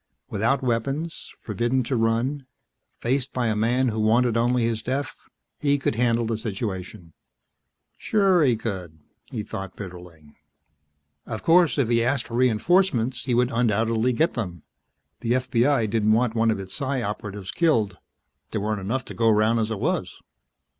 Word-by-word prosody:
Without 120 +6 +1
weapons, 135 +7 -2
forbidden 120 +5 -1
to 130 +2 -2
run, 120 +5 0 0.5
faced 130 +2 0
by 125 -1 0
a 110 -2 +1
man 120 +4 +2
who 110 -1 -3
wanted 115 +2 +3
only 120 +1 +2
his 115 -1 0
death, 135 +4 -3 0.4
he 145 -1 +2
could 135 - -1
handle 115 0 +1
the 110 -1 -2
situation. 95 -5 -5 0.9
Sure 195 -5 +3
he 125 -5 +4
could, 95 -8 -5 0.3
he 115 -6 -5
thought 95 -2 -7
bitterly. 90 -6 -10 0.9
Of 110 -2 -5
course, 170 -2 +4
if 135 -5 +2
he 115 0 +2
asked 130 +1 0
for - - -11
reinforcements 130 - +2
he 125 -3 +1
would 125 +1 +2
undoubtedly 115 +1 +1
get 155 +8 +1
them. 90 - -5 0.6
The 115 - 0
FBI 125 -1 +2
didn't 110 0 +2
want 115 0 +2
one 115 0 +2
of 110 -3 0
its 95 -1 -6
Psi 135 -3 -2
Operatives 100 -2 -5
killed; 110 - +1 0.5
there 110 - -3
weren't 105 -1 -2
enough 125 +7 -2
to - - -8
go 115 -1 +2
round 110 +2 +3
as 110 0 0
it 110 - -2
was. - - -2
115 Hz, 160 wpm, -24 LUFS, 110-130 Hz, 0.9 s, he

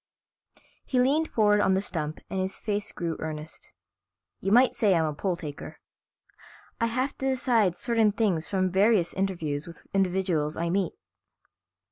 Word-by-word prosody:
He 255 - 0
leaned 290 +6 +3
forward 210 -2 +3
on 190 - +3
the - - +2
stump 155 -6 -4
and 190 - -3
his 190 +1 -2
face 205 -1 -2
grew 170 -2 -3
earnest. 155 0 -7 0.7
"You 195 - -2
might 245 +4 +5
say 210 -7 +3
I'm 165 -1 +2
a 155 - -2
poll 180 +4 -1
taker. 150 -5 -8 1.0
I 230 - +2
have 255 +4 -1
to 270 - -1
decide 235 -8 +2
certain 225 -1 +2
things 200 -7 0
from 185 -2 0
various 195 -1 +3
interviews 170 -6 -2
with 170 - -12
individuals 180 -5 0
I 170 0 -1
meet." 190 -1 0
190 Hz, 155 wpm, -27 LUFS, 170-220 Hz, 1.0 s, might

